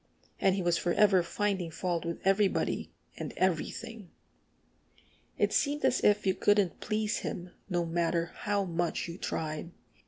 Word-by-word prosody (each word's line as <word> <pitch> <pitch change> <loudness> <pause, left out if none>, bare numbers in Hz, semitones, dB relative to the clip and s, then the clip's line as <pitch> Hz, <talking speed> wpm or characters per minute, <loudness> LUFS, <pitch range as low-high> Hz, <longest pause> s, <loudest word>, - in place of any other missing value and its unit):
And 190 - +3
he 190 - -1
was 175 -1 +2
forever 190 +1 +4
finding 190 0 -1
fault 170 +1 -2
with 170 0 -4
everybody 195 0 +2 0.3
and - - -5
everything. 190 +3 -2 1.3
It - - +2
seemed 290 0 +1
as 250 - +2
if 210 0 +4
you 190 - +3
couldn't 205 -2 +2
please 215 0 -1
him, 175 0 -5 0.2
no 175 -2 0
matter 170 0 0
how 205 -1 -1
much 170 -1 -1
you 170 +2 -7
tried. 155 +1 -3
185 Hz, 145 wpm, -30 LUFS, 170-205 Hz, 1.3 s, forever